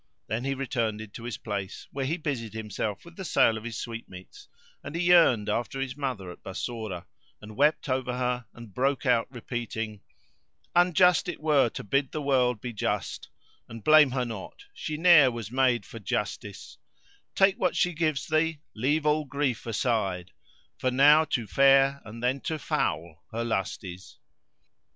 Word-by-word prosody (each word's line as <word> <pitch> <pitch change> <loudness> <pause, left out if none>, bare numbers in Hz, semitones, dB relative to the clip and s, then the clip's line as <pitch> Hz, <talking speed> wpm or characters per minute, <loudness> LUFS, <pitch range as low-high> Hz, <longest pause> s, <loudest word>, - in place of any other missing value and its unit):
Then 115 +4 -3
he 135 0 -1
returned 110 -6 -3
to 115 - -9
his 120 - -4
place 100 -3 -5
where 135 -1 -3
he 165 +5 -1
busied 130 - -4
himself 105 - -4
with 170 0 -14
the 190 - -5
sale 115 -9 +3
of 110 - -6
his 120 -1 -5
sweetmeats; 115 -6 -9 0.4
and 150 - -7
he 170 - 0
yearned 165 -12 +5
after 120 +5 -2
his 135 -1 -3
mother 125 -11 -4
at - - -13
Bassorah, 100 -2 -5 0.3
and 105 0 -11
wept 150 +5 +2
over 130 -1 -1
her 125 -1 -1
and 115 -4 -13
broke 135 +4 0
out 120 -3 +3
repeating:— 115 -4 -5 0.7
"Unjust 180 0 +4
it 175 - -5
were 150 -5 +3
to - - -7
bid 135 +6 0
the 155 - -2
World 130 -4 +2
[FN#460] - - -34
be 120 -1 -5
just 105 - -3 0.2
* - - -35
And 115 -2 -9
blame 155 -2 +7
her 125 -1 -1
not: 115 - -8
She 155 - -5
ne'er 165 -5 +7
was 115 -3 -6
made 125 -5 +2
for 115 - -10
justice: 105 - -4 0.6
Take 195 0 +4
what 180 - +1
she 180 -1 +2
gives 155 -3 0
thee, 160 0 +1 0.2
leave 145 +7 0
all 150 0 +2
grief 135 -3 -2
aside, 100 -6 -1 0.2
* - - -36
For 130 - +1
now 145 +5 +6
to 125 -7 -2
fair 135 +4 +4
and 115 +2 -10
then 130 +2 0
to 160 - -1
foul 85 - -2
her 115 +1 -2
lust 105 -5 -2
is." 90 0 -10
125 Hz, 180 wpm, -27 LUFS, 110-145 Hz, 0.7 s, blame